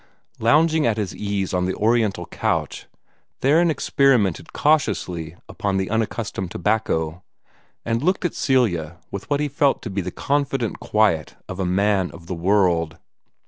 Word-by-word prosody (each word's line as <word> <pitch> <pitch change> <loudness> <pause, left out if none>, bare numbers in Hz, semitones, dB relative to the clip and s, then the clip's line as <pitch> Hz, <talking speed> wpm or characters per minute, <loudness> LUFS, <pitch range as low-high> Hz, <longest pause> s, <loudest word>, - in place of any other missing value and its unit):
Lounging 155 +5 +3
at 110 -2 +1
his 105 -4 -3
ease 100 -2 -2
on 90 0 +1
the 95 - -1
oriental 110 -1 +1
couch, - - -2 0.5
Theron 160 +6 +4
experimented 130 - +2
cautiously 90 - 0
upon 100 -1 -2
the 95 +1 -2
unaccustomed 110 -4 -2
tobacco, 85 -4 -1 0.6
and 115 +1 0
looked 185 +4 +1
at 175 - 0
Celia 85 - +1
with 100 +5 -6
what 145 -1 +1
he 150 - 0
felt 140 0 +1
to 110 - -5
be 100 +1 -1
the - - -4
confident 135 -4 -1
quiet 105 -8 +1
of 95 0 -7
a 95 - 0
man 95 0 +2
of 85 0 -12
the 90 - -4
world. 85 -3 +1
105 Hz, 150 wpm, -22 LUFS, 90-135 Hz, 0.6 s, Theron